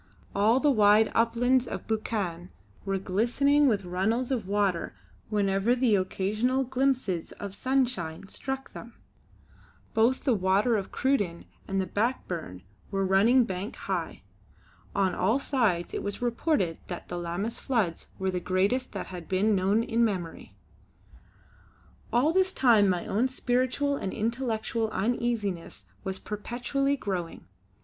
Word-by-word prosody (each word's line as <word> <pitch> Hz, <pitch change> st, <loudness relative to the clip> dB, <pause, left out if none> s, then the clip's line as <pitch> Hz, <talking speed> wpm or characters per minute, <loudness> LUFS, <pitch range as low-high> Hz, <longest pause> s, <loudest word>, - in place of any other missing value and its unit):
All 215 Hz, +5 st, +3 dB
the 295 Hz, +1 st, +3 dB
wide 215 Hz, -2 st, +5 dB
uplands 240 Hz, +2 st, +2 dB
of -, -, -5 dB
Buchan 195 Hz, -6 st, -2 dB, 0.4 s
were 195 Hz, -1 st, 0 dB
glistening 245 Hz, +10 st, +2 dB
with 205 Hz, -6 st, +1 dB
runnels 220 Hz, +8 st, 0 dB
of 230 Hz, -7 st, -1 dB
water 200 Hz, -3 st, 0 dB, 0.3 s
whenever 205 Hz, +2 st, +2 dB
the 245 Hz, -3 st, +2 dB
occasional 210 Hz, +7 st, 0 dB
glimpses 255 Hz, -9 st, 0 dB
of 200 Hz, -1 st, -7 dB
sunshine 235 Hz, -9 st, -1 dB
struck 270 Hz, +5 st, -5 dB
them. 230 Hz, 0 st, -10 dB, 1.0 s
Both 230 Hz, +4 st, +2 dB
the 260 Hz, -, +3 dB
Water 200 Hz, +4 st, +2 dB
of 195 Hz, -3 st, -3 dB
Cruden 205 Hz, -11 st, 0 dB, 0.2 s
and 195 Hz, 0 st, -1 dB
the 190 Hz, -, 0 dB
Back 230 Hz, +7 st, -1 dB
Burn 155 Hz, -, -6 dB, 0.3 s
were 195 Hz, 0 st, 0 dB
running 215 Hz, +7 st, +5 dB
bank 190 Hz, +1 st, -4 dB
high. -, -, -4 dB, 0.7 s
On 190 Hz, -2 st, +2 dB
all 220 Hz, +8 st, +2 dB
sides 230 Hz, -, 0 dB
it -, -, -2 dB
was 205 Hz, 0 st, -4 dB
reported 235 Hz, -, 0 dB
that 175 Hz, -, -6 dB
the 175 Hz, -, -4 dB
Lammas 175 Hz, +7 st, -3 dB
floods 215 Hz, -11 st, -1 dB
were 190 Hz, 0 st, -1 dB
the 180 Hz, -, -1 dB
greatest 195 Hz, +9 st, 0 dB
that -, -, -4 dB
had 175 Hz, -3 st, -9 dB
been 200 Hz, +3 st, +2 dB
known 195 Hz, +4 st, +2 dB
in 230 Hz, 0 st, +1 dB
memory. 185 Hz, -7 st, -3 dB, 1.6 s
All 270 Hz, +7 st, +3 dB
this 375 Hz, +1 st, +2 dB
time 220 Hz, -6 st, +5 dB
my 180 Hz, -2 st, 0 dB
own 230 Hz, +6 st, +1 dB
spiritual 255 Hz, +2 st, 0 dB
and 190 Hz, -, -3 dB
intellectual 225 Hz, -1 st, -1 dB
uneasiness 215 Hz, -4 st, -2 dB, 0.2 s
was 190 Hz, -1 st, -3 dB
perpetually 245 Hz, +7 st, -2 dB
growing. 185 Hz, -8 st, -4 dB
215 Hz, 140 wpm, -28 LUFS, 190-250 Hz, 1.6 s, wide